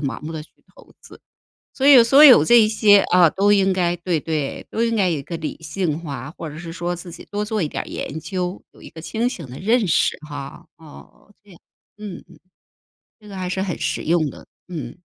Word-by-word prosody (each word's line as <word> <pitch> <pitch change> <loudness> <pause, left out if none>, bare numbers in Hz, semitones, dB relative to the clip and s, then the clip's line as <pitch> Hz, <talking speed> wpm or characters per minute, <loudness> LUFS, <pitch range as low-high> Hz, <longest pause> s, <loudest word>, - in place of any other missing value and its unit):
盲 140 -3 -4
目 160 +2 -7
地 155 -1 -6
去 - - -19 0.3
投 - - -18
资。 - - -16 0.6
所 275 +1 +2
以 255 -5 +8
所 275 +5 +6
有 260 -4 +8
这 235 -3 +5
些， 210 -2 +5
啊， 180 -2 +6
都 205 +1 +2
应 195 -1 +3
该 175 -1 0
对， 175 -2 -2
对， 155 -3 -4
都 230 - -1
应 230 0 0
该 190 -5 +1
有 155 - -1
一 - - -7
个 170 +4 -6
理 155 - -5
性 160 0 -3
化， 140 -4 -7
或 165 - -6
者 150 - -10
是 165 0 -8
说 175 +1 -3
自 175 0 -9
己 170 - -11
多 205 +1 -2
做 215 -1 -2
一 160 - 0
点 - - -4
儿 - - -11
研 160 - -6
究， 180 0 -4
有 - - -20
一 - - -11
个 160 - -11
清 225 +8 -2
醒 170 - -7
的 125 - -9
认 225 +3 +1
识 160 - +2
哈， 140 0 -9
哦， 160 +5 -17
这 205 - -22
样， 175 - -16 0.4
嗯， 205 -4 -8
嗯。 - - -18 0.9
那 200 -2 -10
还 185 -1 -4
是 190 +1 -2
很 185 -4 -4
实 - - -2
用 160 -2 +1
的， - - -14 0.2
嗯。 155 -3 -7
180 Hz, 245 characters per minute, -21 LUFS, 160-205 Hz, 0.9 s, 以